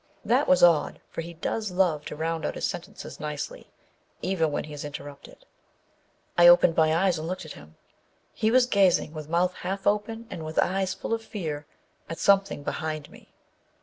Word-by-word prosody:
That - - +2
was 275 0 +4
odd, 170 -3 +4
for - - -4
he 170 +1 -9
does 215 +6 -3
love 180 -5 +1
to - - -6
round 160 +1 -2
out - - -2
his - - -2
sentences - - -6
nicely, - - -6 0.5
even 165 -5 +1
when - - -2
he 150 - -9
is 145 - -6
interrupted. 145 -1 -10 0.9
I 175 - +9
opened 175 -1 +7
my 160 -1 +4
eyes 180 -4 +2
and 160 - -5
looked 185 0 -4
at 155 - -9
him. 75 +1 -15 0.6
He 220 - +1
was 250 +2 +5
gazing, 190 -8 +3
with 155 -1 -8
mouth 180 +2 +2
half 195 +1 -4
open 215 +3 0
and 165 - -6
with 155 0 -7
eyes 190 0 +1
full - - -4
of 225 0 -2
fear, 155 -9 -5 0.4
at 165 - -5
something 195 -6 +2
behind 155 -1 -4
me. - - -17
170 Hz, 185 wpm, -26 LUFS, 155-195 Hz, 0.9 s, I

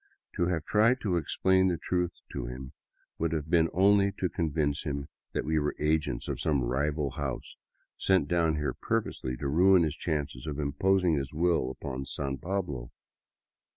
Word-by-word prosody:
To 85 -3 +1
have 85 -3 -1
tried 115 +5 +3
to 95 -5 0
explain 95 +3 +2
the 90 -2 +1
truth 90 0 -2
to - - -4
him 65 +2 -7 0.5
would 80 -1 0
have 80 0 -3
been 80 -2 +4
only 100 +2 +4
to 95 -2 -1
convince 75 -3 0
him 70 -2 -4 0.2
that - - -1
we 80 0 +2
were 75 0 -1
agents 75 0 0
of - - -3
some 70 -5 +1
rival 70 +3 0
house, 70 -3 -4 0.4
sent 95 -6 +3
down 85 -1 +2
here 75 -1 -1
purposely 65 -1 -2
to 70 - -3
ruin 90 +5 +5
his 75 -2 -1
chances 75 -5 -3
of 75 -2 -3
imposing 85 +3 +2
his 70 +1 -4
will 85 -5 +2
upon 65 0 -5
San 70 -1 -3
Pablo. 85 -10 -3
80 Hz, 170 wpm, -29 LUFS, 70-90 Hz, 0.5 s, ruin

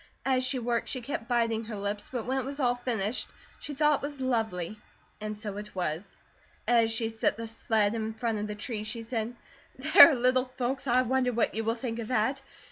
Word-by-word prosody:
As 260 -1 +2
she 255 +1 +1
worked 235 -1 -1
she 255 - -2
kept 235 -2 -5
biting 230 -2 +1
her 220 -1 -6
lips, 205 +1 -4
but 245 -4 -3
when 260 +2 0
it - - -2
was 280 +3 -6
all 245 -3 +3
finished 240 -3 -1 0.3
she 295 - -6
thought 300 0 +3
it - - -18
was 290 -2 -9
lovely, 220 -7 -1 0.4
and 215 0 -4
so 210 -2 -5
it 210 0 -8
was. 175 0 -3 0.5
As 230 -2 +4
she 225 0 -1
set 225 -1 0
the 230 0 -5
sled 220 -2 +1
in 220 -1 -3
front 225 -1 -1
of 210 - -3
the 210 - -5
tree 210 0 -4
she 220 +2 -5
said: 230 0 -3 0.4
"There, 310 +3 +8
little 255 +1 +3
folks, 260 +1 -3
I 250 +1 +4
wonder 255 0 +1
what 235 -1 +1
you 225 - -2
will 225 +1 0
think 235 -1 -4
of 225 - -4
that! 255 +3 +1
230 Hz, 215 wpm, -29 LUFS, 220-255 Hz, 0.5 s, There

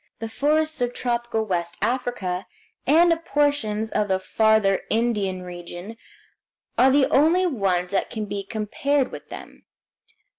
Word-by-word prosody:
The 225 - -5
forests 310 +3 0
of 245 0 -1
tropical 235 -2 -1
West 170 -4 -2
Africa, 210 -5 -2 0.4
and 335 +3 +6
of 330 0 -6
portions 285 -9 0
of 210 - 0
the 190 -1 +2
Farther 215 0 +2
Indian 210 -5 0
region, 175 +4 -8 0.8
are 260 - +5
the 270 0 +4
only 330 +6 +4
ones 190 - 0
that 200 - 0
can 215 -2 -4
be 200 -1 -4
compared 240 +7 -1
with - - -10
them. - - -10
220 Hz, 140 wpm, -24 LUFS, 195-275 Hz, 0.8 s, and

